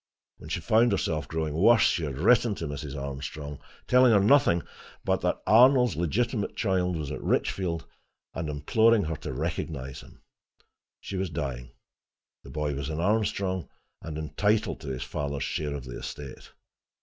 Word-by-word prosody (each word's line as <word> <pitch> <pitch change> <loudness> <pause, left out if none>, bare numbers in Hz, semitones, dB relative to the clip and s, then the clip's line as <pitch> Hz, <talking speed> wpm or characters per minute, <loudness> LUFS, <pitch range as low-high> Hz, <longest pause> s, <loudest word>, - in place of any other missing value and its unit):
When - - -12
she - - -2
found 115 +2 +3
herself 80 -5 -1
growing 80 -2 -2
worse, 105 +7 +5
she 85 - +2
had 70 -3 -5
written 110 - +4
to 85 - -5
Mrs. 75 -1 -5
Armstrong, 70 +1 -6 0.3
telling 125 -1 +5
her 100 - +6
nothing 100 -6 +4 0.4
but - - +1
that - - -1
Arnold's 125 +1 +6
legitimate 105 - -1
child 90 -4 0
was 75 -3 -4
at - - -5
Richfield, 85 -4 -1 0.5
and 80 -2 -4
imploring 110 +10 +3
her 80 0 -3
to - - -6
recognize 75 -4 -4
him. - - -18 0.8
She 100 - -5
was 95 -1 -1
dying: 65 -6 -4 0.7
the - - -12
boy 75 -1 -2
was 70 +1 -4
an 80 0 -3
Armstrong, 95 -1 0 0.3
and 80 -2 -6
entitled 105 +8 0
to 75 - -10
his 65 -2 -3
father's 70 -1 -3
share 75 -2 -2
of 70 - -6
the 60 -1 -7
estate. 70 -2 -8
80 Hz, 160 wpm, -27 LUFS, 75-105 Hz, 0.8 s, her